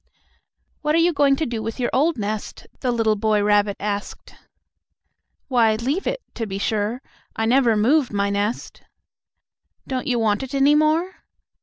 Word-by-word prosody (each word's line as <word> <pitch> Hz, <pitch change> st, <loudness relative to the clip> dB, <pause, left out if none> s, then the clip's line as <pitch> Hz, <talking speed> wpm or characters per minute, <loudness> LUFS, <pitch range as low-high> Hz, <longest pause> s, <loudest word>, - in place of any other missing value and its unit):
"What 300 Hz, 0 st, +1 dB
are -, -, +4 dB
you 335 Hz, +1 st, +3 dB
going 280 Hz, -2 st, +3 dB
to 315 Hz, -, -2 dB
do 235 Hz, -4 st, -4 dB
with 225 Hz, +3 st, -5 dB
your 245 Hz, -, -1 dB
old 300 Hz, +3 st, +2 dB
nest?" 210 Hz, 0 st, -5 dB
the 255 Hz, -, -1 dB
little 225 Hz, -2 st, +1 dB
boy 210 Hz, 0 st, +1 dB
rabbit 205 Hz, -1 st, +2 dB
asked. 205 Hz, 0 st, -5 dB, 1.1 s
"Why 230 Hz, -4 st, +3 dB
leave 270 Hz, -, -2 dB
it, -, -, -3 dB
to 225 Hz, -2 st, -4 dB
be 195 Hz, -1 st, -4 dB
sure. 215 Hz, +4 st, -2 dB, 0.3 s
I 225 Hz, -, -1 dB
never 240 Hz, -2 st, +3 dB
move 260 Hz, +6 st, +2 dB
my 200 Hz, -1 st, 0 dB
nest." 205 Hz, +3 st, -3 dB, 1.1 s
"Don't 260 Hz, +2 st, -3 dB
you 250 Hz, -2 st, +1 dB
want 215 Hz, -1 st, +1 dB
it 265 Hz, +1 st, -6 dB
any 275 Hz, +2 st, +4 dB
more?" 310 Hz, +5 st, +1 dB
235 Hz, 165 wpm, -22 LUFS, 210-280 Hz, 1.1 s, are